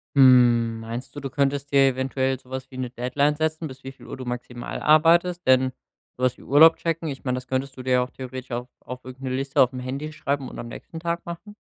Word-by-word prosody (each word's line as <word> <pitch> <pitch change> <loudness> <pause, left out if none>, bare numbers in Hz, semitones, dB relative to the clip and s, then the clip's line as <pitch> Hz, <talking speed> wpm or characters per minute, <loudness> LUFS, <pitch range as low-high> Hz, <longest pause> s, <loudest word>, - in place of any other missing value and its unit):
Hm, 120 -4 +5
meinst 115 +5 -7
du, - - -5
du 135 -1 -5
könntest 140 -1 -1
dir 135 -1 +6
eventuell 130 0 -1
so 130 - -22
was 130 0 -6
wie 130 - -10
'ne 130 -1 -3
Deadline 130 +5 0
setzen, 160 +1 -1
bis 135 0 -12
wie 135 - -6
viel 135 - -16
Uhr - - -7
du 130 - -7
maximal 120 0 -5
arbeitest? 170 +3 +4
Denn, 130 0 +4 0.5
so 130 - -5
was 125 - +2
wie - - -16
Urlaub 160 +4 +7
checken, 165 -1 -2
ich 135 -2 -7
meine, 125 -1 0
das 125 0 -6
könntest 130 +1 -3
du 130 - -7
dir 125 -1 +3
auch 125 - -3
theoretisch 130 0 -8
auf 120 +1 -3
auf 125 0 -9
irgend 130 +1 -10
'ne 130 - -2
Liste 135 0 +1
aufm 125 0 +2
Handy 135 +5 -5
schreiben 140 -3 -2
und - - -10
am 120 - -6
nächsten 165 +6 -9
Tag 170 0 -3
machen. 175 +5 -8
130 Hz, 240 wpm, -24 LUFS, 125-145 Hz, 0.5 s, Urlaub